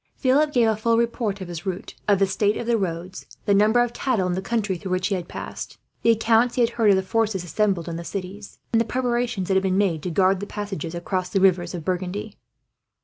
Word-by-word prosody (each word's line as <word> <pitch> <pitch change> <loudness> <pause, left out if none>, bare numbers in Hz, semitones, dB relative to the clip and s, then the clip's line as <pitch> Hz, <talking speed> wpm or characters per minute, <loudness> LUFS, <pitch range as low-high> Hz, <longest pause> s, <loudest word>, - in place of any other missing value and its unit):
Philip 290 +3 +2
gave 240 -5 +3
a 220 - +2
full 230 +2 +1
report 230 -4 -1
of 185 - -5
his 175 -1 -6
route, 190 -1 -5
of 205 -1 +4
the 195 - +3
state 200 +2 +1
of - - -4
the 235 0 +2
roads, 180 -2 -4 0.2
the 200 - +3
number 215 +4 +4
of 240 -1 -3
cattle 240 -7 0
in 180 - 0
the 185 - -2
country 210 -2 -1
through 180 +2 -7
which 185 +2 0
he - - 0
had 180 -3 -3
passed, - - -7 0.2
the 230 - +2
accounts 230 +1 +3
he 250 - +2
had 235 0 +3
heard 225 -3 +2
of 200 - +6
the 190 - +1
forces 215 -2 0
assembled 180 0 0
in 165 -1 -4
the 170 - -6
cities, 195 +3 -7 0.2
and 225 - +4
the - - 0
preparations 240 -5 -1
that 195 - +1
had 190 - +3
been 190 -1 0
made 185 -6 +1
to 180 - -3
guard 185 +2 +3
the 205 - -5
passages 195 -6 -5
across 180 +1 -2
the 195 - +1
rivers 185 -2 +2
of 165 -3 -7
Burgundy. 185 +3 -3
200 Hz, 250 wpm, -23 LUFS, 185-225 Hz, 0.2 s, of